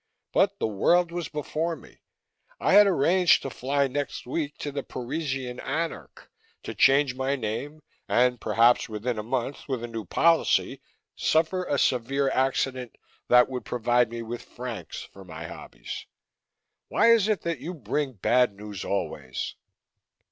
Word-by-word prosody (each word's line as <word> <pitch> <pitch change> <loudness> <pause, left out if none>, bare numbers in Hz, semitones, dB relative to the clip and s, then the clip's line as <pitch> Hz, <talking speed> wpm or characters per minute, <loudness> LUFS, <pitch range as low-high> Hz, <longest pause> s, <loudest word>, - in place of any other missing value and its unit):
But - - +3
the - - -1
world 170 - +2
was 175 -1 -3
before 155 +2 -2
me - - -17 0.6
I - - +2
had 205 +1 +8
arranged 180 +1 +4
to 135 - -4
fly 140 +3 0
next 145 +2 -4
week 145 +3 -3
to 145 - -4
the 140 0 -3
Parisian 130 -1 -4
Anarch, 160 +4 -5 0.3
to - - -5
change 135 -1 +4
my 130 +2 -1
name 140 +6 -5 0.3
and, 125 -1 +2
perhaps 120 +1 +3
within 110 +2 -3
a - - -1
month, 125 +4 -3
with 130 -4 -3
a - - -3
new 115 -2 -5
policy, 165 - +2 0.3
suffer 165 +3 +1
a 145 - 0
severe 135 +2 +1
accident 130 -2 -1 0.3
that 125 0 +6
would 125 -1 -5
provide 120 0 +1
me 115 0 -5
with 120 +1 -6
francs 125 -3 -7
for 95 - -12
my 90 -4 -9
hobbies. - - -8 0.8
Why 230 - +4
is 225 -3 +4
it 215 -3 +1
that 170 -5 -3
you 170 +7 -6
bring 135 +1 -2
bad 120 +1 +2
news 105 -2 -7
always?" 65 -9 -3
130 Hz, 155 wpm, -26 LUFS, 120-150 Hz, 0.8 s, had